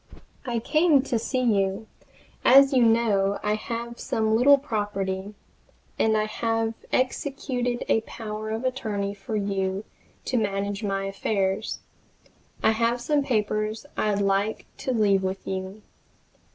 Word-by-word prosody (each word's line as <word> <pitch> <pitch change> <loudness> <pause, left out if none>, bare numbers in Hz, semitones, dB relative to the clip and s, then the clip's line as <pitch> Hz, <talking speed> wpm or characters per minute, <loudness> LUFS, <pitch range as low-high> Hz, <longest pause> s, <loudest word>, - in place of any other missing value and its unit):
I 240 -1 -1
came 300 +3 +3
to 245 -4 -1
see 255 +3 -1
you, 200 -2 +1 0.6
as 275 +2 +7
you 255 - +4
know 220 -4 +3
I 210 - +1
have 235 +2 -5
some 220 0 0
little 280 +5 +6
property, 205 -6 -3 0.6
and 220 0 +3
I 215 - +1
have 225 +1 -1 0.2
executed 255 -2 -1
a 225 - +3
power 215 -1 -6
of 220 +2 -3
attorney 210 -6 -2
for 205 +2 -6
you 195 -1 -1 0.4
to 255 - 0
manage 200 -1 -1
my 195 -1 -1
affairs. 195 +1 -1 0.8
I - - +5
have 230 +2 +1
some 290 +4 +1
papers 215 -1 -1
I'd 205 -1 0
like 200 +2 0
to 260 - -3
leave 205 -5 +3
with 190 0 -3
you. 190 +2 -5
215 Hz, 135 wpm, -25 LUFS, 200-240 Hz, 0.8 s, as